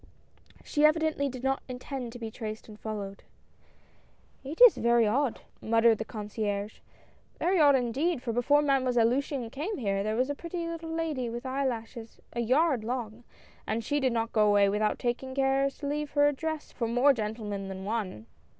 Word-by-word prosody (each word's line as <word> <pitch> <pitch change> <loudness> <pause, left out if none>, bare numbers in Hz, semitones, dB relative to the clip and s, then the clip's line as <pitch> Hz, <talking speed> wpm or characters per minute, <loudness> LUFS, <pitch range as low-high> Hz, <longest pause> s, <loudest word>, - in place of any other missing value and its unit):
She 295 - 0
evidently 305 -2 +3
did 255 -1 -8
not 270 0 0
intend 250 -1 -5
to 245 - -9
be 225 -2 -6
traced 215 -1 -6
and 215 -1 -12
followed. 200 -3 -6 1.2
"It 285 +4 -7
is - - +9
very 235 -1 +3
odd," 250 +4 0 0.2
muttered 225 0 +3
the 220 - -3
concierge, 210 -1 -4 0.6
"very 365 +1 +1
odd 290 -2 +6
indeed, 260 +4 0
for 230 - -2
before 285 +5 +3
Mademoiselle 255 -4 +2
Luciane 255 -1 -1
came 315 - -3
nere, 195 -5 -1
there 215 +2 -1
was 255 +4 +1
a - - -1
pretty 335 +3 -5
little 330 -1 -6
lady 320 -7 -2
with 240 +2 -6
eyelashes 240 -4 -4
a 235 - -3
yard 260 +1 +2
long, 235 -1 -4 0.4
and 225 +2 -1
she 290 +6 0
did 260 -2 +1
not 230 0 -2
go 215 -2 +4
away 205 -1 +5
without 210 +1 0
taking 255 +2 -3
care 270 0 +2
to 285 - -10
leave 295 +1 -2
her 290 0 +5
address 310 +2 -3
for 235 - -3
more 245 +5 +4
gentlemen 210 -3 -4
than 190 0 -7
one." 200 - -3
245 Hz, 175 wpm, -29 LUFS, 220-285 Hz, 1.2 s, is